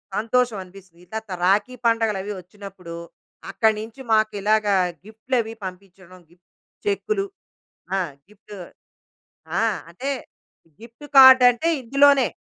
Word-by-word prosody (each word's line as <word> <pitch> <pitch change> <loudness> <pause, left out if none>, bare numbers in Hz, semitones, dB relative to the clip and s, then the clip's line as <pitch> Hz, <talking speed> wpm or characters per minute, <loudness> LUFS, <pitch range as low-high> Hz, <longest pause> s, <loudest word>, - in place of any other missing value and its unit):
సంతోషం 230 +1 0
అనిపిస్తది. 185 -2 -17
తరవాతా 220 -2 -6
రాఖీ 210 +7 +1
పండుగలవీ 215 -3 0
వచ్చినప్పుడు, 185 -2 -11 0.6
అక్కడి 220 +3 +2
నుంచి 225 +4 -10
మాకిలాగా 215 -1 +2 0.3
గిఫ్ట్‌లవీ 225 +1 -3
పంపించడం, 185 0 -11
గిఫ్ 175 +1 -26 0.4
చెక్కులు 405 0 -1 0.7
ఆ! - - 0 0.3
గిఫ్టు 210 0 -14 1.0
ఆ! - - +1 0.3
అంటే, 250 +11 -6 0.7
గిఫ్ట్ 230 +5 -14
కార్డ్ 260 -1 +9
అంటే 245 +7 -2
ఇందులోనే, 275 +2 +4
215 Hz, 100 wpm, -22 LUFS, 195-245 Hz, 1.0 s, కార్డ్